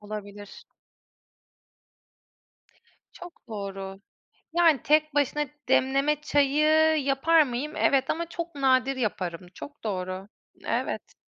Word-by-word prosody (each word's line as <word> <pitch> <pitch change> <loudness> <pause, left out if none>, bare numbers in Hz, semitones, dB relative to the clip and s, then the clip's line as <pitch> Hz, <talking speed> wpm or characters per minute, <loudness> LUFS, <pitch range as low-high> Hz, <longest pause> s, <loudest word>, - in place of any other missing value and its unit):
Olabilir. 205 -1 -9 2.5
Çok 355 -8 -13
doğru. 195 -2 -6 0.5
Yani, 330 -5 +4
tek 305 0 +2
başına 290 +1 +1 0.2
demleme 275 +3 +2
çayı 305 +2 +3
yapar 305 +4 +4
mıyım? 275 +3 -4
Evet 270 -2 +2
ama 335 +1 -2
çok 340 -1 -6
nadir 265 -1 +2
yaparım. 185 -7 -3
Çok 285 - -11
doğru. 185 -1 -4 0.4
Evet. - - -3
275 Hz, 95 wpm, -26 LUFS, 205-305 Hz, 2.5 s, Yani